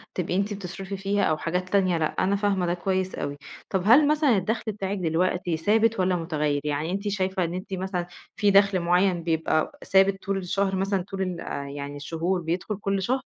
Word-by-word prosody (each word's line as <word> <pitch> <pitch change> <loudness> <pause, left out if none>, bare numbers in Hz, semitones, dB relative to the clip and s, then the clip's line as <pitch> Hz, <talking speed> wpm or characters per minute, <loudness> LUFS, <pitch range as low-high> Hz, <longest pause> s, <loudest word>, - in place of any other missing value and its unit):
تبقي 180 -1 -1
أنتِ 200 +2 0
بتصرفي 195 0 -6
فيها 200 +1 0
أو 155 - +2
حاجات 180 +3 -2
تانية 185 -3 +2
لأ، 160 - +1 0.2
أنا 195 +2 +2
فاهمة 200 -3 +1
ده 175 - 0
كويس 185 +1 -1
أوي، 145 0 -4 0.3
طب 190 -2 0
هل 270 +7 +7
مثلًا 295 -6 +3
الدخل 215 +3 -1
بتاعِك 200 0 -3
دلوقتي 175 0 0
ثابت 220 +5 +2
والّا 185 0 +2
مُتغيّر 150 -4 -1
يعني 150 +3 -2
أنتِ 200 +2 -3
شايفة 190 -2 0
إن 170 0 -2
أنتِ 185 +2 -6
مثلًا 185 -2 -2 0.3
فيه 205 0 +3
دخل 200 -1 +5
مُعيّن 175 0 +2
بيبقى 160 - 0
ثابت 195 0 +3
طول 195 0 -1
الشهر 195 +1 -1
مثلًا 195 0 0
طول 195 +1 -6
ال 185 -2 -2 0.4
يعني 140 0 -6
الشهور 165 +5 -2
بيدخل 175 +5 -2
كل 195 -1 -1
شهر؟ 255 +7 0
190 Hz, 195 wpm, -25 LUFS, 175-200 Hz, 0.4 s, هل